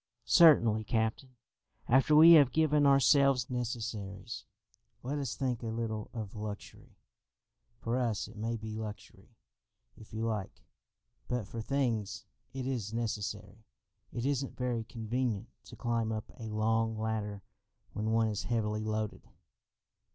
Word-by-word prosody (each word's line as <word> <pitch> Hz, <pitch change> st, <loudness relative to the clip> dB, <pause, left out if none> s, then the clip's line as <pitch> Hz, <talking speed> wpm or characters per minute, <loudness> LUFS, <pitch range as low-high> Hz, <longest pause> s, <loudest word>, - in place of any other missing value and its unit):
"Certainly, 120 Hz, -11 st, +6 dB
captain. 115 Hz, +4 st, -1 dB, 0.5 s
After 135 Hz, +4 st, +4 dB
we 160 Hz, +2 st, +9 dB
have 145 Hz, -6 st, +8 dB
given 150 Hz, -1 st, +3 dB
ourselves 135 Hz, -2 st, +4 dB
necessaries, 110 Hz, -5 st, -4 dB, 0.6 s
let 140 Hz, +4 st, -2 dB
us 135 Hz, -4 st, -3 dB
think 125 Hz, -3 st, -2 dB
a 115 Hz, -, -4 dB
little 110 Hz, -1 st, -3 dB
of 110 Hz, -4 st, -6 dB
luxury. 105 Hz, -1 st, -8 dB, 0.8 s
For 115 Hz, +2 st, -1 dB
us 115 Hz, -6 st, -1 dB
it 110 Hz, -, -14 dB
may 115 Hz, +2 st, -2 dB
be 110 Hz, 0 st, -7 dB
luxury, 110 Hz, -1 st, -8 dB, 0.7 s
if 110 Hz, -, -15 dB
you 110 Hz, +1 st, -3 dB
like, 105 Hz, -4 st, -4 dB, 0.6 s
but 125 Hz, -5 st, -2 dB
for 115 Hz, +2 st, -6 dB
things 115 Hz, -5 st, -1 dB, 0.3 s
it 130 Hz, -1 st, -5 dB
is 120 Hz, -6 st, -3 dB
necessary. 105 Hz, -2 st, -4 dB, 0.5 s
It 120 Hz, 0 st, -4 dB
isn't 140 Hz, -1 st, -1 dB
very 125 Hz, -3 st, -1 dB
convenient 115 Hz, -1 st, -3 dB, 0.2 s
to -, -, -11 dB
climb 115 Hz, -2 st, -1 dB
up 110 Hz, -1 st, -5 dB
a 110 Hz, -1 st, -6 dB
long 110 Hz, +1 st, 0 dB
ladder 105 Hz, -2 st, -3 dB, 0.5 s
when 110 Hz, +1 st, -2 dB
one 115 Hz, 0 st, +3 dB
is 105 Hz, -2 st, -3 dB
heavily 110 Hz, -2 st, -1 dB
loaded." 110 Hz, -1 st, -3 dB
115 Hz, 135 wpm, -31 LUFS, 110-125 Hz, 0.8 s, we